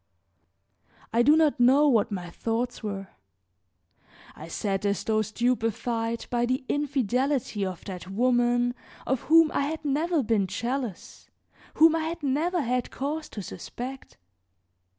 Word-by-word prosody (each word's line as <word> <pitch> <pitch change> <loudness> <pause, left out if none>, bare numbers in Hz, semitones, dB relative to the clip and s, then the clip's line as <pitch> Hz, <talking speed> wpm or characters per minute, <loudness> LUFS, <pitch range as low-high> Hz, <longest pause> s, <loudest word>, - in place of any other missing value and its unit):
I 230 - +4
do 295 +6 +6
not 310 -4 +3
know 270 +5 +5
what 225 -5 +3
my 180 -3 -5
thoughts 235 +5 -2
were; 195 -3 -5 1.3
I 155 - -9
sat 195 +3 -2
as 200 -1 0
though 215 -1 +1
stupefied 230 0 -1
by 240 0 +1
the 255 +2 -1
infidelity 265 -5 0
of 185 -2 -5
that 185 -2 -7
woman 245 +2 +2 0.3
of 265 -1 0
whom 325 -1 +6
I 280 - 0
had 315 0 -5
never 305 +2 +1
been 215 -4 +1
jealous, 240 +1 -4 0.5
whom 320 +1 +6
I 320 -1 -1
had 335 0 -5
never 310 +5 0
had 250 0 -1
cause 300 +3 -4
to 205 - -7
suspect. 260 +7 -8
245 Hz, 135 wpm, -27 LUFS, 215-285 Hz, 1.3 s, do